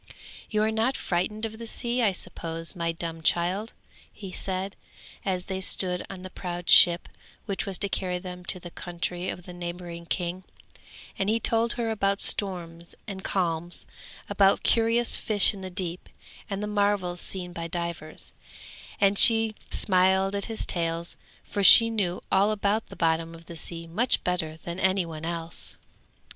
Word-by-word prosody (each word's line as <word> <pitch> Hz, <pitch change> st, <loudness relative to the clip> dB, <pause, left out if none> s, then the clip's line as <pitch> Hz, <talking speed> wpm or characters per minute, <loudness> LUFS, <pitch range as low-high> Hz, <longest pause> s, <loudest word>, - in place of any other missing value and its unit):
'You 215 Hz, -1 st, +1 dB
are 220 Hz, -, +1 dB
not 225 Hz, +4 st, 0 dB
frightened 205 Hz, +5 st, -2 dB
of 220 Hz, 0 st, -7 dB
the 230 Hz, -, -7 dB
sea, 240 Hz, +2 st, -1 dB
I 215 Hz, -4 st, +3 dB
suppose, 165 Hz, -1 st, -2 dB
my 170 Hz, -1 st, -1 dB
dumb 165 Hz, 0 st, -6 dB
child?' 180 Hz, +7 st, 0 dB, 0.4 s
he 195 Hz, -3 st, -10 dB
said, 190 Hz, +1 st, -4 dB, 0.5 s
as 185 Hz, -2 st, -2 dB
they 190 Hz, -1 st, -4 dB
stood 180 Hz, -1 st, +1 dB
on 185 Hz, -2 st, -9 dB
the 185 Hz, -, -8 dB
proud 175 Hz, -2 st, -4 dB
ship 175 Hz, -1 st, +7 dB, 0.4 s
which 200 Hz, 0 st, -3 dB
was 195 Hz, -2 st, +1 dB
to 200 Hz, -, +2 dB
carry 180 Hz, -1 st, -2 dB
them 180 Hz, 0 st, -8 dB
to 185 Hz, -, +2 dB
the 175 Hz, -1 st, -10 dB
country 175 Hz, +1 st, -4 dB
of 180 Hz, -, -6 dB
the 180 Hz, -, -10 dB
neighbouring 175 Hz, -1 st, -7 dB
king; 180 Hz, +1 st, -3 dB, 0.8 s
and 195 Hz, -, 0 dB
he 225 Hz, +1 st, +2 dB
told 230 Hz, +1 st, +1 dB
her 230 Hz, -2 st, -2 dB
about 200 Hz, -2 st, 0 dB
storms 170 Hz, -4 st, -2 dB
and 195 Hz, -2 st, -7 dB
calms, 175 Hz, -2 st, -1 dB, 0.4 s
about 200 Hz, -1 st, +3 dB
curious 230 Hz, +1 st, +3 dB
fish 210 Hz, -1 st, +4 dB
in 195 Hz, -, -10 dB
the 185 Hz, -, -6 dB
deep, 180 Hz, -1 st, -4 dB, 0.4 s
and 200 Hz, 0 st, -4 dB
the -, -, -1 dB
marvels 205 Hz, -4 st, 0 dB
seen 180 Hz, -2 st, -5 dB
by 170 Hz, -1 st, -5 dB
divers; 170 Hz, -2 st, -6 dB, 0.7 s
and 200 Hz, 0 st, +3 dB
she 225 Hz, -1 st, +7 dB, 0.2 s
smiled 190 Hz, 0 st, +2 dB
at 200 Hz, 0 st, +1 dB
his 225 Hz, -1 st, -4 dB
tales, 170 Hz, 0 st, -3 dB, 0.3 s
for 200 Hz, -, -3 dB
she 230 Hz, +3 st, +10 dB
knew 185 Hz, -5 st, -2 dB
all 195 Hz, +2 st, +4 dB
about 210 Hz, +1 st, -1 dB
the -, -, -12 dB
bottom 165 Hz, 0 st, 0 dB
of 165 Hz, 0 st, -15 dB
the 170 Hz, -, -10 dB
sea 165 Hz, 0 st, -6 dB
much 220 Hz, +10 st, +1 dB
better 160 Hz, -3 st, -2 dB
than 170 Hz, +1 st, -6 dB
any 190 Hz, -1 st, +1 dB
one 160 Hz, -1 st, -7 dB
else. 170 Hz, 0 st, -5 dB
185 Hz, 170 wpm, -26 LUFS, 170-205 Hz, 0.8 s, she